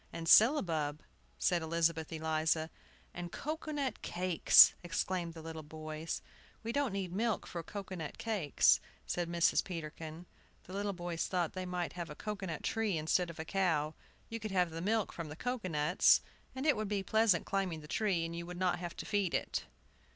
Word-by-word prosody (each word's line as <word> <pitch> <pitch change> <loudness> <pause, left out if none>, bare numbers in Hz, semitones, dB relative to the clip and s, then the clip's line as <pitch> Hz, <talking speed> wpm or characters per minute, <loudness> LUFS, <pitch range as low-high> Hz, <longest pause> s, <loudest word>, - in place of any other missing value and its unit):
"And 165 0 -5
syllabub," 165 - +5 0.3
said 175 -1 +2
Elizabeth 160 -1 0
Eliza. 160 0 0 0.4
"And 175 -1 -6
cocoa 310 - -4
nut 280 -3 -2
cakes," 180 -1 +6
exclaimed 175 0 -2
the 160 - -9
little 160 0 -6
boys. 155 +1 -5 0.4
"We 225 - -2
don't 280 -1 0
need 190 -2 -3
the 185 - -4
milk 225 -2 0
for 170 - -5
cocoa 195 +3 -7
nut 160 -5 -6
cakes," 205 -11 +3 0.3
said 175 -1 -2
Mrs. 170 -1 +3
Peterkin. 165 -1 -7 0.4
The 185 - -11
little 200 0 -1
boys 175 -2 -3
thought 175 -3 -1
they 185 -1 -4
might 180 -1 -2
have 175 -2 -5
a 150 - -7
cocoa 210 0 -4
nut 160 -3 -5
tree 220 -6 0
instead 165 +3 +1
of 170 - -9
a 160 - -5
cow. 160 -5 +1 0.3
You 230 - -5
could 215 0 -4
have 180 -3 +1
the 165 +1 -5
milk 215 +2 0
from 165 -3 -6
the 150 - -7
cocoa 245 0 -3
nuts, 150 +2 +4 0.3
and 265 +2 -3
it 305 - +5
would 215 -1 -2
be 200 -2 -1
pleasant 220 -4 +3
climbing 190 -5 -1
the 150 - -11
tree, 185 -3 +1
and 165 0 -5
you 170 0 -5
would 180 0 -7
not 180 -1 +1
have 175 -1 -5
to - - -5
feed 205 -4 0
it. - - -2
175 Hz, 195 wpm, -34 LUFS, 160-200 Hz, 0.4 s, cakes